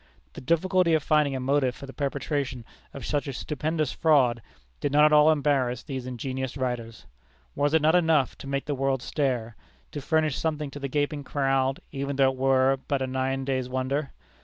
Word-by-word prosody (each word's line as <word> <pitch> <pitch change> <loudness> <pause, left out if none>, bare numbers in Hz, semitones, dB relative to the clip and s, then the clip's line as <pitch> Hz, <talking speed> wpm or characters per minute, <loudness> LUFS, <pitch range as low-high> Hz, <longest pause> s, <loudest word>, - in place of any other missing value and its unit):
The - - -9
difficulty 170 +3 +2
of 155 - 0
finding 150 -3 +2
a - - -2
motive 130 -1 +1
for - - -9
the 135 - -10
perpetration 140 -3 -3 0.3
of 135 -4 -8
such 145 -1 -1
a 140 - -4
stupendous 155 +2 -2
fraud, 130 -8 +3 0.4
did 145 - -1
not 150 +1 +6
at 155 - +4
all 150 +1 +7
embarrass 135 -5 0
these 130 -4 -5
ingenious 130 +1 -4
writers. 120 -3 -4 0.5
Was 145 +2 +1
it 160 - +3
not 160 +1 +4
enough 160 -6 +3
to - - -9
make 140 0 -2
the 145 - -2
world 135 -1 -1
stare? 125 -6 -2 0.4
to 150 -2 -5
furnish 155 -1 +1
something 150 -3 -2
to 145 - -8
the 140 - -3
gaping 145 +1 -1
crowd, 135 -1 0
even 140 0 -3
though 135 -1 +4
it 130 - -10
were 135 0 +3
but 140 -2 0
a - - 0
nine 130 +1 -2
days' 130 -2 -1
wonder? 130 +3 -2
140 Hz, 195 wpm, -26 LUFS, 130-150 Hz, 0.5 s, all